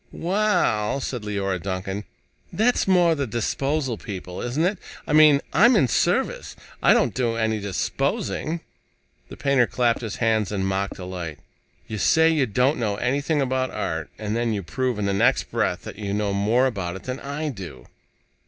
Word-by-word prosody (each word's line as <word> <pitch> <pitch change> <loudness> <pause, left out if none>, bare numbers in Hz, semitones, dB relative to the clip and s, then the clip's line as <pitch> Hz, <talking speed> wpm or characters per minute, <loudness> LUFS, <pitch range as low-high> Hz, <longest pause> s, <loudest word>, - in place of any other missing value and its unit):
"Well," 175 - +1
said 125 -2 -4
Leora 100 -3 -2
Duncan, 95 +2 -4 0.5
"that's 235 +1 +2
more 175 -3 +4
the 140 -4 -2
disposal 130 +3 -1
people, 90 -4 -7
isn't 135 +7 0
it? 190 +1 0 0.3
I - - -2
mean, 150 -2 +7
I'm 235 - +6
in 160 -11 +4
service. - - 0 0.3
I - - +5
don't - - +2
do 120 -3 0
any 110 -1 0
disposing." 105 - -2 0.7
The - - -10
painter 135 -4 +3
clapped 120 -2 +1
his 110 -4 -4
hands 110 -4 +1
in 95 -2 -1
mock 95 +1 -1
delight. 90 -4 -6 0.5
"You 110 - -5
say 160 +7 +4
you 150 -5 +2
don't 125 +7 +1
know 105 -4 0
anything 140 +6 0
about 130 0 0
art, 80 -1 -3
and 105 0 -3
then 115 -1 0
you 100 -2 -3
prove 125 +8 -2
in 105 - -1
the 100 - 0
next 120 +7 +2
breath - - 0
that - - -9
you 100 -1 -2
know 105 -1 0
more 110 +6 +2
about 95 -8 -2
it 95 - -9
than 130 +1 -4
I 150 +2 -4
do! 95 - -8
115 Hz, 175 wpm, -24 LUFS, 100-140 Hz, 0.7 s, mean